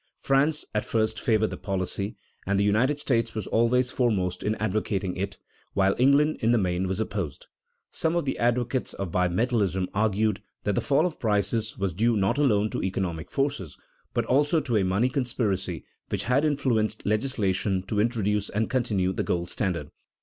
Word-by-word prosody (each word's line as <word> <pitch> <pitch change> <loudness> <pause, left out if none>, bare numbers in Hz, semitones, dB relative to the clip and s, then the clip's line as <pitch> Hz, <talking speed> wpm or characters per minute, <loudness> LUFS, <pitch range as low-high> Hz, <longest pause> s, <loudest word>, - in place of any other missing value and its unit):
France 145 +3 +2
at 105 - 0
first 110 -1 0
favored 110 -4 +2
the 90 - -5
policy, 95 +2 -2 0.3
and 100 0 +2
the - - +3
United 120 +8 +2
States 115 -5 0
was 110 -3 -3
always 125 +4 +2
foremost 100 -8 0
in 105 +1 0
advocating 105 -3 -1
it, 100 +1 -3 0.4
while 95 0 +3
England 140 +4 +4
in 115 -3 +1
the 120 - +4
main 90 -2 0
was 95 +2 -2
opposed. 100 -9 -3 0.5
Some 165 +1 0
of 170 - 0
the 135 - -2
advocates 120 +2 0
of 95 -4 -4
bimetallism 95 +1 +1
argued 105 0 +1 0.2
that 105 - 0
the - - 0
fall 145 +4 +2
of 175 -3 -3
prices 105 0 0
was 95 -2 -1
due 115 +5 +2
not 100 +7 +1
alone 110 -7 +2
to - - -2
economic 90 -4 -3
forces, 135 - -2 0.3
but - - 0
also 145 +5 +3
to 125 -6 -2
a 105 - +3
money 95 +6 +2
conspiracy 110 - -1 0.3
which - - -1
had 130 +4 +2
influenced 125 -8 0
legislation 100 -4 0
to 105 +2 -2
introduce 105 -2 +1
and 110 +2 -1
continue 105 -8 +1
the - - -1
gold 85 0 -2
standard. 95 -5 -2
110 Hz, 175 wpm, -26 LUFS, 95-125 Hz, 0.5 s, England